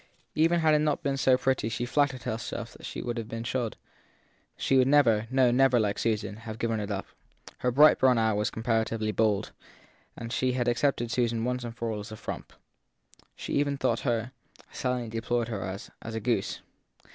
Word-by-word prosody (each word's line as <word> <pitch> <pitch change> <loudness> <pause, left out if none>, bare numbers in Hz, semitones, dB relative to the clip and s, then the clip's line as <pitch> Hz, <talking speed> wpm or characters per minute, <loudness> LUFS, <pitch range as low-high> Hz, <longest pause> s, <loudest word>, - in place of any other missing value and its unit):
Even 165 +2 +3
had 155 -1 +4
it 150 - +4
not 150 -1 0
been 140 -1 0 0.2
pretty 130 -3 0
she 120 +2 -3
nattered 140 -3 +2
herself 110 +1 -4 0.2
it - - -4
would 120 -1 -3
have 110 - -5
been 115 0 -4
shod: 120 -2 -2 0.8
she 135 - +1
would 130 -1 +5
never 115 -7 +4
no, 130 -1 +4
never, 130 0 +4
like 105 -2 0
Susan 105 -3 -1
have 110 -1 -7
given 115 -1 -1
it 105 -1 -4
up. 100 -1 -3 0.5
Her 125 - +1
bright 145 +5 +6
brown 130 -2 +5
eye 110 -1 +2
was 105 +1 0
comparatively 110 -1 -1
bold, 105 -2 +1 0.7
and 115 +1 -6
she 130 0 +1
had 125 -1 -1
accepted 120 -1 +1
Susan 120 -2 0
once 125 +1 -1
for 115 -1 -3
all 105 - -3
as 105 +2 -8
a 110 - -7
frump. - - -7 0.8
She - - -6
even 140 -1 +1
thought - - +1
her, 120 -1 -1 0.4
and - - -19
silently 125 -2 -2
deplored 115 +1 -1
her 105 -4 -3
as, 95 +4 -6
a 110 0 -4
goose. 115 +2 -1
120 Hz, 190 wpm, -28 LUFS, 110-130 Hz, 0.8 s, bright